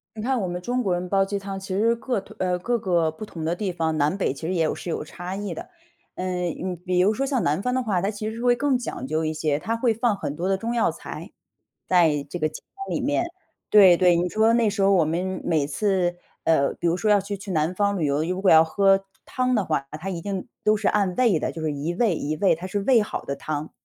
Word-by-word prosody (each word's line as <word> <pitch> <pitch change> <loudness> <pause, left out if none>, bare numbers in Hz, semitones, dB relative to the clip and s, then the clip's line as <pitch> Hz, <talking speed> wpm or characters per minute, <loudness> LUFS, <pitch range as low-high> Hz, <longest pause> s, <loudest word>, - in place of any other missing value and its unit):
你 215 - -5
看 255 0 0
我 185 - -2
们 175 0 -4
中 245 +7 -1
国 190 - 0
人 180 +1 -3
煲 195 +1 +3
鸡 200 +1 -3
汤， 195 -1 -6
其 195 - -10
实 230 +2 +3
各 235 -1 -2
退 195 - -15
呃， 180 -1 +1
各 240 +6 0
个 175 -6 +1
不 160 +7 -8
同 165 -6 -7
的 165 +2 0
地 190 +1 -3
方， 160 -2 -1
南 150 +6 +1
北 190 - +1
其 160 - -6
实 185 - -1
也 165 -2 +2
有 155 - 0
是 175 - -6
有 160 - -3
差 180 +4 -7
异 205 0 -4
的。 350 +2 -8 0.5
呃， 185 - -4 0.3
你 180 +3 -4
比 180 +1 -2
如 195 +4 +4
说 270 - -1
像 265 -4 0
南 150 +6 +1
方 250 - -1
的 260 - +1
话， 205 -7 0
它 195 - 0
其 215 0 -5
实 220 - -5
是 235 - -6
会 245 0 +4
更 280 0 +2
讲 230 - -5
究 155 +3 -1
一 155 - -1
些， 155 -2 0
它 225 +8 -2
会 230 -1 +1
放 230 -1 +1
很 145 - -4
多 175 +4 -2
的 195 - +2
中 230 +4 -3
药 235 - +2
材， - - -8 0.6
在 160 -6 +3
这 175 - -5
个 155 -2 +1
鸡 - - -10
汤 390 0 -5
里 - - -1
面。 290 +6 +1 0.5
对 190 -4 +8
对， 180 -1 +4
你 175 +1 +1
说 220 +4 +3
那 235 -2 +3
时 200 -1 -2
候 195 - +5
我 180 -4 +4
们 180 +4 -2
每 155 -5 +1
次 180 +2 0 0.3
呃， 140 -4 +2
比 175 - -3
如 170 - +1
说 210 +3 0
要 205 -1 +5
去 200 +1 -5
去 195 +1 -9
南 160 +1 +1
方 200 +1 +1
旅 160 - +1
游， 140 +1 +1
如 180 +3 -2
果 195 - +5
要 160 0 +8
喝 195 +3 +3 0.2
汤 255 0 0
的 210 -4 +1
话， 145 -5 -1
他 190 - -5
一 180 -3 -3
定 195 -1 -4 0.2
都 215 0 +4
是 205 -1 0
按 200 -3 +1
位 230 -9 +3
的， - - -2
就 165 - -7
是 155 - 0
一 145 +4 -3
位、 215 -1 +2
一 150 +1 -2
位， 190 +2 +3
他 175 +3 -7
是 195 +1 -3
煨 245 -3 +5
好 - - -5
的 140 - -4
汤。 155 0 -4
190 Hz, 295 characters per minute, -24 LUFS, 165-215 Hz, 0.6 s, 对